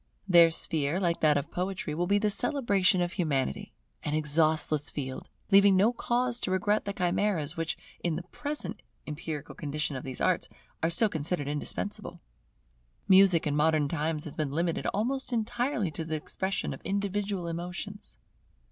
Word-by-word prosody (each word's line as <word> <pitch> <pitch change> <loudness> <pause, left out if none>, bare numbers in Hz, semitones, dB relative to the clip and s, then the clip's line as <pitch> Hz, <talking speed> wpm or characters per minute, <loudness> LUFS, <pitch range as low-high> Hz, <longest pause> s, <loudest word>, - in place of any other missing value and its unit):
Their 170 -3 +7
sphere, 160 0 -1
like 170 -3 0
that 150 -2 +4
of 145 +3 -3
Poetry, 180 -4 -3
will 175 +3 -1
be 200 +2 +3
the 210 0 +1
celebration 200 -7 +2
of 175 0 -1
Humanity; 140 - -1 0.3
an 150 - -2
exhaustless 155 -1 +2
field, 130 -3 -6 0.2
leaving 200 0 +7
no 215 +6 +4
cause 240 +1 0
to - - -2
regret 205 +3 +1
the 200 - -3
chimeras 180 -3 0
which, 165 -1 -2 0.3
in 170 -3 0
the 175 - -4
present 290 - -6 0.2
empirical 150 -1 -6
condition 150 -1 -3
of 130 - -5
these 130 -1 -6
arts, - - +1 0.3
are 165 - +2
still 175 +7 +5
considered 155 -3 -2
indispensable. 145 0 -4 0.9
Music 190 -4 +6
in 145 -1 0
modern 150 -1 +3
times 155 0 -1
has 150 - -6
been 155 -3 -1
limited 165 +4 -1
almost 260 +6 -1
entirely 240 - -1
to 160 - -5
the 160 0 -3
expression 190 +5 -3
of - - -10
individual 200 -1 -2
emotions. 180 +5 -6
175 Hz, 160 wpm, -29 LUFS, 155-200 Hz, 0.9 s, Their